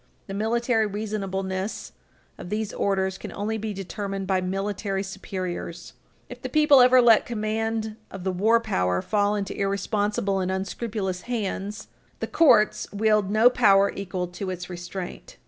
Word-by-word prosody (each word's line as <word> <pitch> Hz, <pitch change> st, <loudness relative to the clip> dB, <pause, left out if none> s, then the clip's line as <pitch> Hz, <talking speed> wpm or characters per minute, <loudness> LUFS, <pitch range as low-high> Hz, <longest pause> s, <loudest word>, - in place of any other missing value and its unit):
The 195 Hz, -, -7 dB
military 225 Hz, +2 st, +1 dB
reasonableness 195 Hz, -2 st, -3 dB, 0.5 s
of 175 Hz, -, -8 dB
these 215 Hz, 0 st, -2 dB
orders 190 Hz, -1 st, 0 dB
can -, -, -7 dB
only 220 Hz, +2 st, -2 dB
be 215 Hz, 0 st, -3 dB
determined 195 Hz, 0 st, -4 dB
by 190 Hz, -1 st, +1 dB
military 195 Hz, +1 st, -2 dB
superiors. 185 Hz, -3 st, -6 dB, 0.3 s
If -, -, -10 dB
the -, -, -4 dB
people 300 Hz, -3 st, +6 dB
ever 250 Hz, 0 st, +7 dB
let 230 Hz, -2 st, +6 dB
command 220 Hz, -1 st, -2 dB
of 195 Hz, -2 st, -8 dB
the 190 Hz, -, 0 dB
war 220 Hz, +6 st, +3 dB
power 90 Hz, -, 0 dB
fall 205 Hz, -1 st, +1 dB
into 200 Hz, -1 st, -3 dB
irresponsible 200 Hz, 0 st, 0 dB
and 185 Hz, 0 st, -1 dB
unscrupulous 190 Hz, 0 st, -3 dB
hands, 210 Hz, -2 st, -3 dB, 0.3 s
the -, -, -1 dB
courts 240 Hz, -10 st, +4 dB
wield 210 Hz, -1 st, +2 dB
no 215 Hz, +3 st, +5 dB
power 200 Hz, -5 st, +5 dB
equal 190 Hz, -2 st, -3 dB
to 185 Hz, +2 st, -5 dB
its 180 Hz, 0 st, -5 dB
restraint. 180 Hz, -, -7 dB
200 Hz, 145 wpm, -25 LUFS, 190-220 Hz, 0.5 s, ever